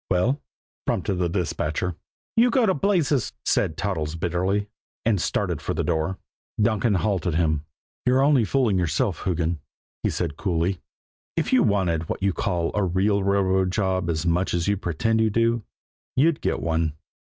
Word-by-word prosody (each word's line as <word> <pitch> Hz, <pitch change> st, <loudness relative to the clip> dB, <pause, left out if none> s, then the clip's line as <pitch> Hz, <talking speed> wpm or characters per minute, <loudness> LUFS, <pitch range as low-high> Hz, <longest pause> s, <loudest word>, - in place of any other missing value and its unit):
"Well?" 110 Hz, +11 st, +1 dB, 0.5 s
prompted 95 Hz, -, 0 dB
the 90 Hz, -1 st, +1 dB
dispatcher. 85 Hz, -1 st, -1 dB, 0.4 s
"You 235 Hz, +2 st, +5 dB
go 245 Hz, -1 st, +3 dB
to 190 Hz, -, +3 dB
blazes!" 160 Hz, -, +1 dB
said 80 Hz, -, +1 dB
Toddles 80 Hz, -7 st, -2 dB
bitterly, 90 Hz, +4 st, 0 dB, 0.4 s
and 105 Hz, -5 st, +2 dB
started -, -, -1 dB
for -, -, -2 dB
the -, -, 0 dB
door. 85 Hz, +2 st, 0 dB, 0.4 s
Donkin 110 Hz, 0 st, +2 dB
halted 95 Hz, -4 st, 0 dB
him. 80 Hz, -3 st, +1 dB, 0.4 s
"You're 130 Hz, +2 st, +4 dB
only 140 Hz, -4 st, +4 dB
fooling 110 Hz, -4 st, +2 dB
yourself, 80 Hz, -4 st, 0 dB
Hoogan," 85 Hz, -2 st, 0 dB, 0.4 s
he -, -, +1 dB
said 80 Hz, -4 st, -2 dB
coolly. 90 Hz, -1 st, 0 dB, 0.6 s
"If -, -, 0 dB
you -, -, +6 dB
wanted 85 Hz, -6 st, +1 dB
what -, -, -3 dB
you 100 Hz, -2 st, +2 dB
call 85 Hz, -3 st, -1 dB
a 105 Hz, -, +1 dB
real 95 Hz, +3 st, +2 dB
railroad 95 Hz, -1 st, +2 dB
job 95 Hz, -3 st, 0 dB
as 80 Hz, +1 st, -1 dB
much 90 Hz, +2 st, +1 dB
as 85 Hz, +1 st, -1 dB
you 100 Hz, -, +3 dB
pretend 110 Hz, +5 st, 0 dB
you 110 Hz, -, +3 dB
do, 115 Hz, +2 st, +2 dB, 0.5 s
you'd 150 Hz, +4 st, +3 dB
get -, -, -1 dB
one." 80 Hz, -2 st, 0 dB
95 Hz, 165 wpm, -24 LUFS, 85-110 Hz, 0.6 s, you